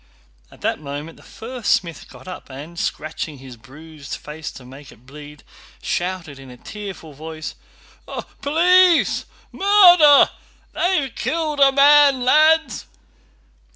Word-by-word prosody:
At - - -19
that - - -2
moment 145 +2 -8
the - - -18
first 240 0 -7
smith 170 -3 -2
got - - -15
up 180 - -10
and, 150 +6 -10
scratching 155 -1 -5
his 130 -2 -12
bruised 145 +5 -11
face 150 +1 -9
to 125 - -13
make 135 +2 -14
it 120 +2 -21
bleed, 150 +1 -13 0.4
shouted 175 -5 -4
in 135 -1 -13
a 125 - -13
tearful 195 - -10
voice: 155 +2 -8 0.9
"Police! 350 +4 +3 0.3
Murder!... 355 -8 +6 0.4
They've 310 -8 -1
killed 310 -2 -3
a 275 -1 +6
man, 280 -2 +5
lads!" 315 +4 +2
175 Hz, 125 wpm, -20 LUFS, -, 0.9 s, Murder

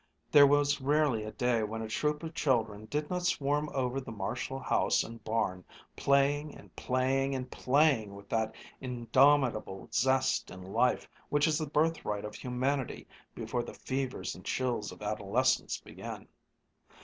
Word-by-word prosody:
There 145 -1 +9
was 145 0 +3
rarely 140 -5 +2
a 110 - -5
day 125 -2 +1
when 110 +1 -3
a - - -4
troop 150 +7 -1
of 165 0 -5
children 110 -8 0
did 150 +6 -2
not 180 0 -1
swarm 150 -4 0
over 130 0 -1
the 130 - -8
Marshall 115 +6 -3
house 130 - +2
and 115 0 -10
barn, 110 -5 -1 0.3
playing 145 +2 +2
and - - -16
playing 135 +2 0
and 130 -1 -5
playing 130 -7 +2
with 100 0 -12
that 110 -1 0 0.2
indomitable 125 -4 +2
zest 130 +2 +2
in 90 0 -10
life 115 +7 +1 0.2
which 145 0 +3
is 160 -1 +2
the 155 -2 -3
birthright 150 -10 0
of 105 - -6
humanity 130 +1 -2 0.3
before 115 +1 -2
the 120 - -8
fevers 130 -1 -3
and - - -12
chills 120 -5 -1
of - - -11
adolescence 105 +4 +1
begin. - - -9
130 Hz, 155 wpm, -31 LUFS, 110-145 Hz, 0.3 s, There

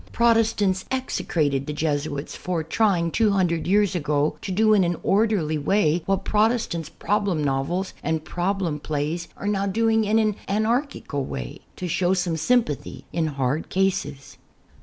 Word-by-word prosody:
Protestants 225 -5 +2
execrated 155 - -1
the 150 - -3
Jesuits 145 -1 -2
for 175 -3 -2
trying 170 -1 +1
two 220 +3 +3
hundred 170 -4 +1
years 205 +1 +3
ago 150 -3 0
to 195 - -5
do 215 +3 +4
in 200 -3 +5
an 175 0 0
orderly 195 -7 +2
way 170 0 +2
what 195 0 0
Protest 220 +1 +2
ants' 165 -3 -4
problem 200 -6 -1
novels 145 +8 -1
and 160 -1 -2
problem 175 -3 -1
plays 155 +3 -3
are 200 - -5
now 200 -1 0
doing 225 +2 +2
in 215 +1 +2
an 215 -2 +1
anarchical 220 - -1
way; 60 - -6 0.2
to 180 - -4
show 180 +2 +1
some 175 -2 -1
sympathy 160 - 0
in 165 -2 0
hard 140 +1 -2
cases. 165 -8 -1
180 Hz, 155 wpm, -24 LUFS, 155-210 Hz, 0.2 s, in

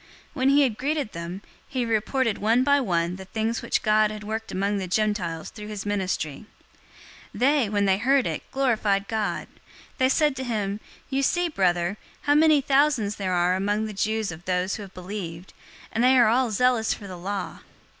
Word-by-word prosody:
021:019 - - -25 0.3
When 260 -1 +2
he 285 +1 +5
had 235 -6 0
greeted 285 -3 -1
them, 170 +3 -6 0.3
he 255 -3 -2
reported 230 +1 0
one 225 +4 +3
by 285 +1 +4
one 175 -5 0
the 190 - -9
things 220 +3 -2
which - - -1
God 215 0 +4
had 215 0 -7
worked 220 +1 -4
among 200 +2 0
the 190 - -4
Gentiles 180 -5 -1
through 210 -1 -9
his 210 -2 -6
ministry. 190 -4 -2 0.9
021:020 - - -7
They, 265 -3 +3
when 205 -1 +1
they 190 0 +2
heard 270 +2 +3
it, - - -2
glorified 215 -7 +1
God. 220 -2 -2 0.5
They 260 0 +4
said 295 0 +2
to 260 - -3
him, 210 -4 -2 0.3
"You 270 +1 +1
see, 350 +5 +1
brother, 180 - +1 0.2
how 290 - +2
many 305 -1 +5
thousands 270 -7 +2
there 190 -2 -2
are 175 0 +2
among 205 +3 0
the 215 - -5
Jews 215 0 -1
of 160 +2 -10
those 185 +1 0
who - - -4
have 195 -2 -10
believed, 180 -2 -7 0.4
and 230 - 0
they 260 +1 +5
are 240 -3 +6
all 250 +2 +2
zealous 235 +1 +2
for 205 - -11
the 185 -2 -7
law. 185 -2 -5
215 Hz, 195 wpm, -25 LUFS, 190-255 Hz, 0.9 s, are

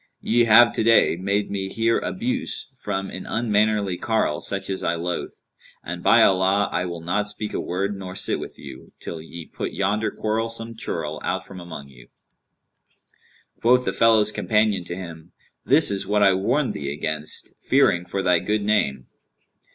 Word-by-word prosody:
Ye 120 +1 +3
have 115 +2 +7
today 115 -5 +4
made 100 +3 -1
me 95 -1 -3
hear 115 +3 +1
abuse 250 - -3
from 95 -5 -4
an 95 - -7
unmannerly 105 -4 +1
carle 110 -10 0
such 100 -1 -4
as 95 -1 -3
I 85 - 0
loathe; 85 +1 -3 0.5
and 85 +1 -6
by 115 +4 +6
Allah, 95 +1 +3
I 90 - -1
will 85 -2 -6
not 105 +5 -1
speak 105 0 -4
a - - -2
word 100 +3 -2
nor 95 -1 -8
sit - - -1
with - - -8
you, 70 -3 -12
till 80 - -6
ye 80 +1 -9
put - - -6
yonder 105 +3 0
quarrelsome 115 +1 -3
churl 80 -7 -4
out - - -2
from 95 -2 -10
among 80 -5 -9
you!' - - -17 1.5
Quoth 125 +2 +4
the - - -1
fellow's 110 -2 +4
companion 105 -4 +1
to 85 - -5
him, 85 -2 -9 0.3
'This 145 -1 +4
is 100 -1 -2
what 105 0 +2
I 100 -1 +6
warned 125 +9 0
thee 70 -1 -4
against, 75 +1 -3
fearing 85 - +3
for 95 +2 -3
thy 90 -2 +4
good 105 +4 -1
name.' 70 -12 +1
100 Hz, 170 wpm, -23 LUFS, 85-110 Hz, 1.5 s, have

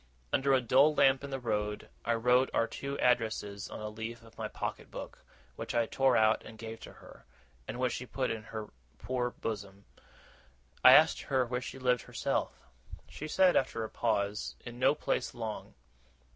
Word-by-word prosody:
Under 135 +1 +2
a 130 - +3
dull 135 +6 +4
lamp 135 -1 +4
in 140 - -5
the 135 -1 -3
road, 105 -3 -2 0.2
I 115 - +1
wrote 125 +3 +3
our 115 - +3
two 140 +3 -5
addresses 110 -4 0
on - - -7
a 105 - -4
leaf 115 +2 -7
of 115 - -17
my - - -4
pocket - - -5
book, - - -9 0.3
which - - -5
I 120 -1 +3
tore 135 +2 +2
out 110 0 +3
and 110 - -11
gave 110 0 -7
to - - -11
her, - - -16 0.4
and 120 - -5
which 125 -1 +1
she 125 - -5
put 130 0 -1
in 110 -1 -4
her 110 -1 -7 0.3
poor 125 - -2
bosom. 100 -4 -6 1.0
I - - +10
asked - - +6
her 130 -2 +1
where 125 +1 -2
she 130 - -7
lived 125 -2 +1
herself. - - -3 0.4
She 155 - -7
said, 185 +3 +4
after 120 -3 +1
a 110 - -5
pause, 105 -3 -1
in 120 0 -8
no 130 +3 +4
place 130 - -2
long. 110 -2 -6
120 Hz, 185 wpm, -31 LUFS, 110-130 Hz, 1.0 s, I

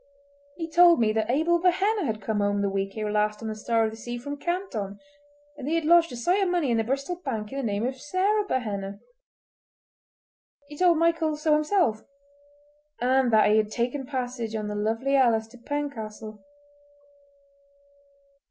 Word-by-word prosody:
He 330 -2 -5
told 340 -1 +6
me 215 -2 +2
that 220 0 -1
Abel 325 +7 +2
Behenna 385 +2 +2
had 215 -2 -4
come 215 +1 -1
home 205 0 +1
the 200 - 0
week 195 +1 -3
ere 215 -1 -2
last 210 +1 0
on - - -4
the 220 - -3
Star 225 +1 0
of 220 - -2
the - - -9
Sea 240 +1 -6
from 285 +4 -6
Canton, 285 - -4 0.6
and 280 -2 -8
that - - -1
he 325 - +1
had 330 -2 0
lodged 335 +1 +5
a - - -6
sight 355 +12 +1
of 385 - +1
money 345 -8 +1
in 230 - +2
the 225 - +1
Bristol 275 +9 -2
Bank 225 -11 -5
in 275 - -5
the - - -3
name 210 -1 -1
of 260 +1 -4
Sarah 390 +7 +1
Behenna. 200 - -3 1.7
He 295 - -10
told 355 -2 +4
Michael 330 -1 +1
so 305 0 +2
himself—and 285 - -2
that 215 -1 +5
he 215 - +4
had 215 -1 +1
taken 250 +4 -2
passage 245 -4 -4
on 210 -1 -3
the 210 - -4
Lovely 225 +6 0
Alice 235 -5 +3
to 245 - -16
Pencastle. 220 -7 -5
260 Hz, 180 wpm, -26 LUFS, 220-310 Hz, 1.7 s, told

